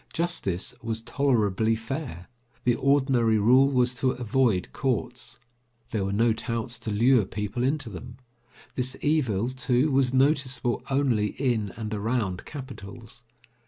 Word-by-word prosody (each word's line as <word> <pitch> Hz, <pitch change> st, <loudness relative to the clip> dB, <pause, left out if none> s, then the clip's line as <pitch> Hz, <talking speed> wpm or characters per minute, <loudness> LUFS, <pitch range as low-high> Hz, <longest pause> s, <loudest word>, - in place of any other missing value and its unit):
Justice 165 Hz, -, -2 dB
was 115 Hz, -1 st, -4 dB
tolerably 115 Hz, -5 st, +1 dB
fair. 115 Hz, -, -5 dB, 0.4 s
The 120 Hz, -, +3 dB
ordinary 130 Hz, -4 st, +3 dB
rule 130 Hz, +6 st, +5 dB
was 125 Hz, -2 st, +2 dB
to 130 Hz, +1 st, 0 dB
avoid 125 Hz, -5 st, +1 dB
courts. 125 Hz, -2 st, -2 dB, 0.5 s
There 105 Hz, -3 st, -1 dB
were 100 Hz, -, -2 dB
no 115 Hz, +3 st, +3 dB
touts 115 Hz, +1 st, -4 dB
to 115 Hz, -, -5 dB
lure 120 Hz, +3 st, +4 dB
people 105 Hz, +4 st, -4 dB
into 140 Hz, 0 st, 0 dB
them. 115 Hz, +4 st, -8 dB, 0.6 s
This 130 Hz, +1 st, -2 dB
evil, 125 Hz, -8 st, +1 dB
too, 130 Hz, +2 st, +1 dB
was 130 Hz, -2 st, +3 dB
noticeable 130 Hz, -3 st, +1 dB
only 130 Hz, -6 st, +2 dB
in 115 Hz, -7 st, 0 dB
and 110 Hz, -1 st, -4 dB
around 105 Hz, -3 st, -1 dB
capitals. 125 Hz, -4 st, -9 dB
120 Hz, 130 wpm, -26 LUFS, 110-135 Hz, 0.6 s, rule